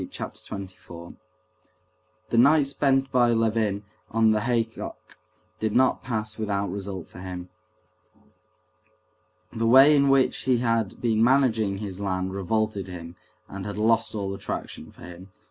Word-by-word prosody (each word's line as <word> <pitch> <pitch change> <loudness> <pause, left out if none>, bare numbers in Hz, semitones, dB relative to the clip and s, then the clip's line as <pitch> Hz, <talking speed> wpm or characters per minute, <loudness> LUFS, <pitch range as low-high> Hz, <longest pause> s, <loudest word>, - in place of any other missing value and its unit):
Chapter - - -7
24 90 -4 -9 1.2
The 115 - 0
night 145 +3 +5
spent 135 -1 +1
by 120 -2 +3
Levin 110 -3 0 0.3
on 110 0 +3
the 110 - +2
haycock 115 -1 -3 0.4
did 110 -1 -1
not 130 +1 +3
pass 110 -2 -4
without 100 -3 -1
result 95 -2 -6
for - - -13
him. 90 -1 -7 2.0
The 115 0 -1
way 135 +5 +7
in 140 -1 +3
which 135 -1 +3
he 130 -2 +3
had 115 -4 -1
been 115 -2 +2
managing 115 -6 +2
his 100 -2 -6
land 95 -1 -2
revolted 100 0 -1
him 85 -2 -9 0.3
and 100 0 -7
had 100 +1 -6
lost 115 +1 +1
all 100 -2 -3
attraction 100 - -6
for - - -16
him. 90 +2 -11
110 Hz, 140 wpm, -25 LUFS, 95-120 Hz, 2.0 s, way